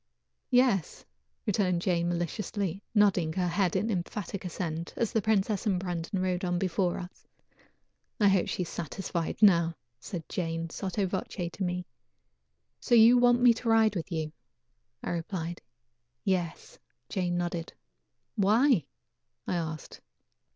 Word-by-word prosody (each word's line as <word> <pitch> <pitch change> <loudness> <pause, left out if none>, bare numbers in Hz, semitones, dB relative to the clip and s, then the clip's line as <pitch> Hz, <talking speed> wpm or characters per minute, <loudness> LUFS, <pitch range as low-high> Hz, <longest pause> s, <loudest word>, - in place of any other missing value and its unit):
"Yes," 245 - +2 0.4
returned 185 -4 +1
Jane 175 -2 +1
maliciously, 185 +2 -2
nodding 190 -6 +3
her 180 0 0
head 180 +1 +1
in 210 +4 +1
emphatic 190 +1 -4
assent, 170 -2 -4
as 230 - 0
the 220 - +1
princess 210 0 +1
and 190 -3 +2
Brandon 180 0 -3
rode 185 0 -1
on 175 -1 0
before 180 0 0
us. 180 0 -10 0.9
"I 205 - +5
hope 195 -2 +3
she 180 - -1
is 170 - -7
satisfied 170 +3 -3
now," 170 -4 +5 0.2
said 165 +7 -6
Jane 165 -2 -3
sotto 195 +3 -2
voce 180 -1 -3
to 195 - -4
me. 180 0 -2 0.9
"So 240 - +2
you 235 +2 +8
want 245 0 +4
me 245 -1 +7
to 230 +1 -3
ride 220 -2 +4
with 175 +1 -4
you?" 160 -2 -2 0.7
I - - -2
replied. 170 0 -4 0.6
"Yes," 175 -2 -2 0.4
nodded 175 -2 -1
Jane. - - -15 0.6
"Why?" 215 - +4 0.6
I - - -2
asked. 160 -3 -4
185 Hz, 135 wpm, -29 LUFS, 170-205 Hz, 0.9 s, you